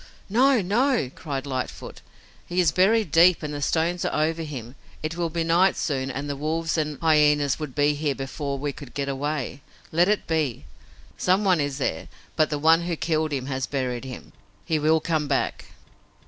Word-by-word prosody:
"No! 250 +1 +4
No!" 230 - +1
cried 140 -3 -5
Lightfoot. 130 -2 -5 0.5
"He 175 +1 -1
is 170 -4 +4
buried 195 +1 +3
deep 170 +1 +5
and 150 -1 -4
the 145 - -4
stones 165 +4 0
are 155 - +1
over 165 +1 -2
him. 130 -7 -7 0.3
It 155 +1 -3
will 170 -1 -1
be 165 +1 -1
night 175 +4 +3
soon 135 -3 -1
and 140 +2 -4
the 145 - -3
wolves 160 +3 -1
and 150 -3 -1
hyenas 150 -3 +3
would 150 -5 -6
be 145 0 +3
here 145 -1 -1
before 140 +1 -4
we 145 +1 -3
could 135 -3 -12
get 140 -1 -2
away. 140 0 -3 0.3
Let 175 +4 +3
it 210 - +1
be. 150 - -1 0.5
Someone 185 -2 +3
is 145 -1 -2
there, 105 - -2 0.3
but 155 -1 +3
the 150 - -1
one 160 +3 +4
who 170 0 -2
killed 155 -1 -1
him 135 -3 -2
has 130 -1 -3
buried 130 -3 -2
him. 130 -1 -9 0.3
He 160 -2 0
will 155 +1 +3
come 155 -2 -1
back!" 140 - -1
155 Hz, 190 wpm, -25 LUFS, 140-165 Hz, 0.5 s, deep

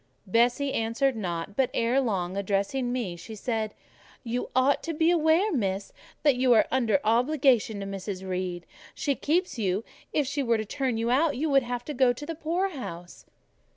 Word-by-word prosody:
Bessie 245 +7 +2
answered 230 +4 +1
not; 180 -2 -4
but 265 0 +2
ere 240 +4 +2
long, 190 -7 -1
addressing 200 +6 -1
me, 235 -9 -2
she 220 +6 -9
said— 220 -1 -2 0.5
"You 245 0 -3
ought 260 +2 +3
to 330 -1 -4
be 325 +2 +3
aware, 335 +5 +3
Miss, 195 -6 -2 0.3
that 290 -3 +5
you 255 -1 +4
are 220 - +5
under 230 -7 +2
obligations 240 -2 +2
to - - -4
Mrs. 195 -1 -5
Reed: 180 -2 -3 0.3
she 285 - 0
keeps 320 0 0
you: 195 0 0 0.3
if 295 - +1
she 285 +2 -2
were 235 -3 +2
to 215 - -3
turn 255 +1 -2
you 230 +1 0
off, 290 +3 +3
you 295 +4 -1
would 275 -1 +5
have 245 -1 -4
to 300 - -4
go 255 -2 +4
to 290 - -8
the 330 - -4
poorhouse." 310 - -4
245 Hz, 185 wpm, -27 LUFS, 200-280 Hz, 0.5 s, that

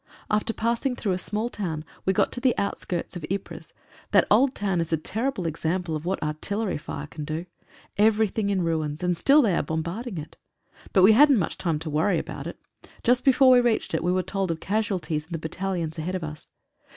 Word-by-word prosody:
After 210 +1 +1
passing 235 +3 -1
through 210 -5 -2
a 180 - 0
small 215 +4 -2
town 165 -9 -4 0.2
we - - +5
got - - +2
to 245 - -5
the 255 -2 +2
outskirts 185 -3 -3
of 175 - -6
Ypres 195 0 -5 0.4
That - - +5
old 255 +5 +4
town 195 -4 0
is 165 - -4
a 160 - +3
terrible 215 - -2
example 165 +1 -1
of 155 +1 -5
what 185 -1 -1
artillery 190 +6 -2
fire 145 0 -6
can 150 0 -8
do. 155 +3 -4 0.5
Everything 215 -1 +3
in 190 -3 +1
ruins, 160 -1 -2
and 180 0 +1
still 280 - +5
they 200 -7 +2
are - - +2
bom 160 0 -2
barding 200 +4 -5
it. 155 0 -8 0.5
But 190 - +4
we 200 - +9
hadn't 275 +4 +6
much 185 - -1
time 165 -4 0
to 155 +1 -6
worry 155 +7 +2
about - - -5
it. - - -8 0.4
Just 245 +1 +3
before 265 -1 +6
we 250 -1 +7
reached 235 -7 0
it 160 - 0
we 175 - +2
were 185 0 +1
told 195 -1 -2
of 165 -1 -2
casualties 190 -7 -1
in 170 - -10
the - - -1
battalions 165 0 -3
ahead 180 +4 -2
of 180 - -3
us. 155 -1 -7
185 Hz, 215 wpm, -25 LUFS, 160-220 Hz, 0.5 s, we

